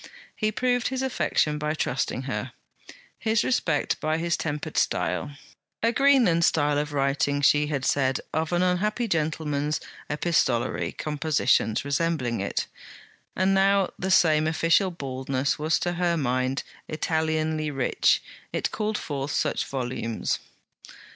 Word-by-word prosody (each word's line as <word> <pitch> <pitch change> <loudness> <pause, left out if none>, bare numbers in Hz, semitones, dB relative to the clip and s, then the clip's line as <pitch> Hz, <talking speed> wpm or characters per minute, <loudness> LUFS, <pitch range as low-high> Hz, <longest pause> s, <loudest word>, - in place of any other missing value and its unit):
He 215 0 0
proved 245 +1 +1
his 260 0 -2
affection 150 -11 0
by 150 +1 -1
trusting 130 -3 -1
her; 130 -1 -4 0.7
his 220 0 +1
respect 165 - 0
by 155 +1 0
his 170 +1 0
tempered 150 -2 -4
style: 145 - 0 0.5
'A 230 - +4
Greenland 245 -10 +4
style 145 -3 +2
of 150 0 -3
writing,' 140 0 +1
she 150 +1 +4
had 140 -3 -2
said 135 -2 +1
of 160 +1 -1
an 175 +1 +2
unhappy 210 +6 0
gentleman's 155 -3 -1 0.3
epistolary 145 -6 0
compositions 145 -6 +1
resembling 140 -5 0
it; 100 - -2 0.7
and 190 +1 +2
now 195 0 +3
the 190 - -2
same 155 -4 +4
official 165 +4 +3
baldness 135 -4 -2
was 155 +2 +2
to 175 - -1
her 175 -1 +1
mind 130 -1 0 0.3
Italianly 155 -1 -1
rich; 135 -3 +2 0.3
it - - -1
called 215 0 -1
forth 140 -1 -4
such - - 0
volumes. 125 -4 -2
155 Hz, 130 wpm, -26 LUFS, 140-175 Hz, 0.7 s, A